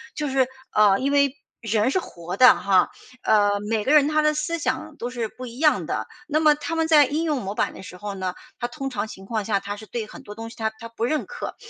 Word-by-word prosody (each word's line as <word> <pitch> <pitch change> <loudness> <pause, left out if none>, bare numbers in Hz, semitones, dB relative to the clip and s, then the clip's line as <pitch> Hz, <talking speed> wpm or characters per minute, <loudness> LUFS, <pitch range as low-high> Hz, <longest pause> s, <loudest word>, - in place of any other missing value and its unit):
就 300 -1 -2
是， 265 -1 +2 0.2
啊， 205 -2 +5
因 275 +5 0
为 280 -1 +3 0.3
人 225 0 +1
是 375 - +2
活 175 - -7
的 255 - +8
哈， 195 -2 +3 0.3
啊， 205 -1 +4 0.2
每 220 -2 +1
个 265 - +1
人 290 -2 +6
他 305 0 +2
的 305 0 +3
思 305 +2 -2
想 315 +1 -2
都 240 - -4
是 235 -3 -3
不 255 +4 -10
一 240 0 -9
样 305 -1 +3
的。 - - -3 0.2
那 305 0 +1
么 305 -1 +6
他 300 +3 -4
们 325 0 +1
在 300 -3 +7
应 300 +5 -1
用 300 -5 0
模 195 +1 -5
板 - - 0
的 - - -10
时 180 - -10
候 205 +2 -5
呢， 185 -2 -3 0.2
他 240 - -1
通 270 +2 -5
常 215 -4 -3
情 195 -2 -11
况 215 0 -2
下， 200 -1 +1
他 205 +1 -5
是 210 +1 -11
对 230 -2 -4
很 - - -11
多 205 - -9
东 225 +1 -7
西， 230 - -13
他 220 -1 -1
他 230 - -7
不 230 0 -6
认 300 +5 0
可， - - -6
240 Hz, 280 characters per minute, -24 LUFS, 210-300 Hz, 0.3 s, 的